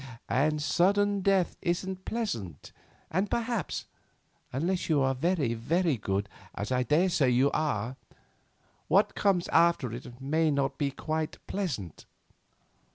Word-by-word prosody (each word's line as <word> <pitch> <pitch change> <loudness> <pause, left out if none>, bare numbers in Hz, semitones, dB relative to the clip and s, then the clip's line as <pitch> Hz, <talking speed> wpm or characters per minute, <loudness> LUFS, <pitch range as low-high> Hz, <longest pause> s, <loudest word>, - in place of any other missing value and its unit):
And 150 +5 +2
sudden 200 +6 +2
death 190 -2 +2
isn't 185 +2 -2
pleasant, 115 - -4 0.4
and 190 +4 0
perhaps—unless 190 - -4
you 155 -3 +4
are 135 0 +2
very, 145 -3 0
very 155 +7 +1
good, 100 -2 -2 0.3
as 105 +5 -4
I 125 0 +2
daresay 150 +1 +3
you 130 +3 +3
are—what 145 - -2
comes 190 -4 +1
after 165 -7 +3
it 120 +1 -9
may 155 +4 +1
not 140 -1 0
be 145 -2 +1
quite 155 +3 -3
pleasant. 130 - -4
155 Hz, 115 wpm, -29 LUFS, 130-185 Hz, 0.4 s, you